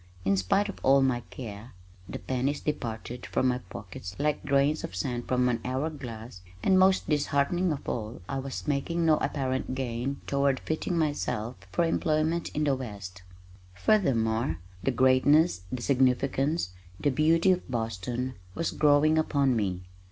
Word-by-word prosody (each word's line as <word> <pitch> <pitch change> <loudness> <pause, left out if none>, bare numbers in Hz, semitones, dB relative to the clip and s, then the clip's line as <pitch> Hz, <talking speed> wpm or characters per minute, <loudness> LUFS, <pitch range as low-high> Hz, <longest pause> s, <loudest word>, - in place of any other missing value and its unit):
In 100 +1 +3
spite 95 - +2
of 200 - -7
all 135 +1 +5
my 130 -2 +2
care, 110 -1 -8 0.4
the - - -4
pennies 130 +3 -1
departed 120 -4 -4
from 130 - +1
my 125 0 0
pockets 90 -1 -9
like 150 +1 0
grains 140 +2 +2
of 165 - -6
sand 120 -3 -3
from 125 0 +2
an 120 -2 0
hour 130 +5 -1
glass 115 -8 -8 0.2
and 190 -1 +4
most 190 0 +4
disheartening 150 +4 +1
of 145 - -5
all 110 0 -4
I 135 - -2
was 135 +2 -6
making 165 +4 0
no 155 -1 +5
apparent 130 -2 -2
gain 130 +1 -3
toward 140 -1 +1
fitting 160 +2 -2
myself 145 -7 -1 0.2
for 170 - +2
employment 160 0 0
in 150 - +1
the 140 -2 +2
west. 100 -7 -7 0.5
Furthermore, 115 - +2 0.2
the 100 - 0
greatness, 130 - +4
the 125 -2 -4
significance, 135 - +1 0.3
the 145 - +2
beauty 165 +6 +4
of 180 -5 -1
Boston 120 +2 -3 0.2
was 165 - -1
growing 150 +1 +4
upon 140 -4 +2
me. 95 -5 -1
135 Hz, 155 wpm, -28 LUFS, 120-150 Hz, 0.5 s, all